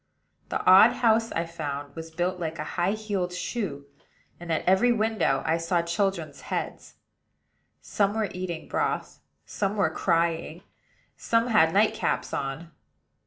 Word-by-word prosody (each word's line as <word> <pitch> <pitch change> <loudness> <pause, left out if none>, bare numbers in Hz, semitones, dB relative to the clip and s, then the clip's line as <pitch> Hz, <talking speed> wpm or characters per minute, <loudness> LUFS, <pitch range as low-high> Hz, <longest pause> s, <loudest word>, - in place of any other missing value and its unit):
The - - -3
odd - - +8
house, 225 -1 +2
I 165 - -1
found, 145 -4 -6
was 165 0 -7
built 180 +3 -2
like 160 -2 -4
a 150 - -3
high 180 +3 +1
heeled 205 -4 -2
shoe; 180 -6 -4 0.5
and 175 -1 -6
at 160 - -1
every 190 +7 +4
window 215 - +1
I 160 - +2
saw 170 +1 0
children's 195 +3 -2
heads. - - -5 0.9
Some 200 0 0
were 220 -3 0
eating 180 -3 -5
broth; - - -2 0.3
some 200 0 -2
were 195 -6 +1
crying; 165 0 0
and - - -30 0.5
some 230 +1 +1
had 210 -8 +5
nightcaps 215 +4 +1
on. 140 +5 -4
180 Hz, 145 wpm, -26 LUFS, 165-210 Hz, 0.9 s, odd